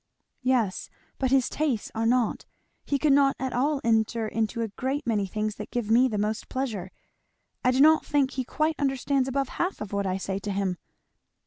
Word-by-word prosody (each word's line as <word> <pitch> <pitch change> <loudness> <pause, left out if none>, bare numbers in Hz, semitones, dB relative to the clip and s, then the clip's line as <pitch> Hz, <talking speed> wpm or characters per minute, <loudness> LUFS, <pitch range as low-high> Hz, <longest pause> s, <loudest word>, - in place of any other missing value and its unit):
"Yes, 250 -7 0 0.3
but 265 - +1
his 265 -1 +3
tastes 285 -8 -1
are 225 0 0
not. 240 -2 +1 0.4
He 285 - +1
could 290 0 +3
not 275 -1 +4
at 260 -1 -3
all 280 +4 +1
enter 225 0 +1
into 225 +1 -1
a - - -1
great 265 +7 -3
many 210 -4 0
things 215 +2 -3
that 210 - -7
give 235 -3 -2
me 245 +3 +6
the 215 -4 -2
most 210 +2 -2
pleasure. 225 -9 -3 0.7
I 250 - +4
do 255 +1 +3
not 315 +1 +6
think 280 -2 +1
he 265 -1 -2
quite 310 +5 -1
understands 270 -1 +1
above 270 0 -1
half 360 +3 -2
of 210 -1 -6
what 200 -1 0
I 185 0 0
say 195 0 -3
to 205 - -6
him." 190 -2 -1
245 Hz, 200 wpm, -26 LUFS, 215-270 Hz, 0.7 s, me